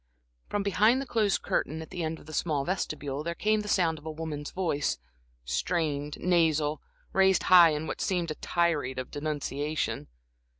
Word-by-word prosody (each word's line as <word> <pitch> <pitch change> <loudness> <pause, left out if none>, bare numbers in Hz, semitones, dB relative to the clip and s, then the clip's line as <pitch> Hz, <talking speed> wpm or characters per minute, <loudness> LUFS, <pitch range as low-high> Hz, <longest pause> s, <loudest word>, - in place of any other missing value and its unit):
From 205 -1 -1
behind 210 +5 +4
the 275 - -3
closed 215 -5 +1
curtain 155 +3 -1
at 160 - -9
the 180 -2 -4
end 160 0 -2
of - - -15
the 155 - -10
small 150 -3 0
vestibule, 150 -6 -3
there 170 +1 -3
came 215 +3 +2
the 210 - -7
sound 165 -6 +2
of 150 - -19
a - - -2
woman's 155 -2 -5
voice, 165 -6 -1 0.5
strained, 150 - -1
nasal, 160 -4 +2 0.3
raised 190 0 +4
high 175 -2 +10
in 150 0 -2
what - - -4
seemed 175 -4 0
a - - -1
tirade 155 -6 0
of 130 - -5
denunciation. 150 0 -2
160 Hz, 175 wpm, -28 LUFS, 150-180 Hz, 0.5 s, high